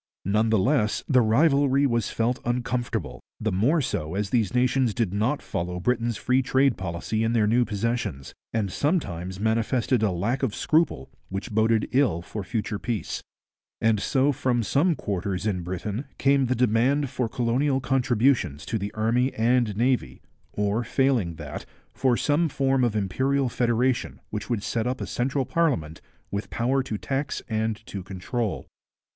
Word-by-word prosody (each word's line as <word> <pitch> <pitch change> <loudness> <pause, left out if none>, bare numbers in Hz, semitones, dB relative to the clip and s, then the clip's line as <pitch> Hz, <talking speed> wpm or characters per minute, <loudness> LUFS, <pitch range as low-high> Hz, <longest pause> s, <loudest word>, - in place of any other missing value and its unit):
None 105 +4 +2
the 110 - +3
less 110 0 +1
the 130 -2 +4
rivalry 140 +3 +3
was 115 -5 +1
felt 120 +2 0
uncomfortable, 120 0 -2 0.2
the 110 0 -1
more 125 - +2
so 80 - -3
as 100 0 -2
these 115 -6 +2
nations 125 -2 +2
did 110 -6 0
not 110 +8 0
follow 90 +1 -3
Britain's 120 +2 0
free 130 +4 +2
trade 130 0 +2
policy 95 +5 -2
in 115 +1 +1
their 110 -3 +3
new 120 +3 +3
possessions, 105 - -3 0.2
and 105 -4 -1
sometimes 95 - -1
manifested 115 +3 +1
a 110 - +3
lack 105 +9 -1
of 125 -7 -1
scruple 155 - +1 0.2
which 95 +2 -5
boded 110 0 +2
ill 125 -11 +2
for 105 +3 -6
future 105 +1 -3
peace. 110 0 -3 0.6
And 110 -2 +2
so 135 +6 +2
from 125 -3 0
some 155 - +2
quarters 100 -4 -3
in 95 -4 0
Britain 100 +8 -4
came 140 -1 +3
the 130 - +1
demand 125 +4 +2
for 125 -3 -1
colonial 130 +4 +1
contributions 125 - +1
to 110 - -2
the 100 +1 -4
Army 120 +4 +1
and 115 -2 +2
Navy, 125 +2 0 0.3
or 105 +3 0
failing 120 -8 +1
that, 75 -3 -7 0.3
for 130 -3 +2
some 155 +2 +2
form 135 -1 +1
of 115 -3 +1
imperial 130 +7 +1
federation 120 - 0
which 105 +2 -4
would 115 -4 -1
set 115 0 -1
up 130 +1 -2
a - - -3
central 135 +2 -1
parliament 105 - 0 0.3
with 100 +1 -3
power 130 +3 +1
to 120 -5 -4
tax 135 +4 -3
and 110 -1 -2
to 100 - -6
control. 95 +4 -3
115 Hz, 165 wpm, -25 LUFS, 105-130 Hz, 0.6 s, the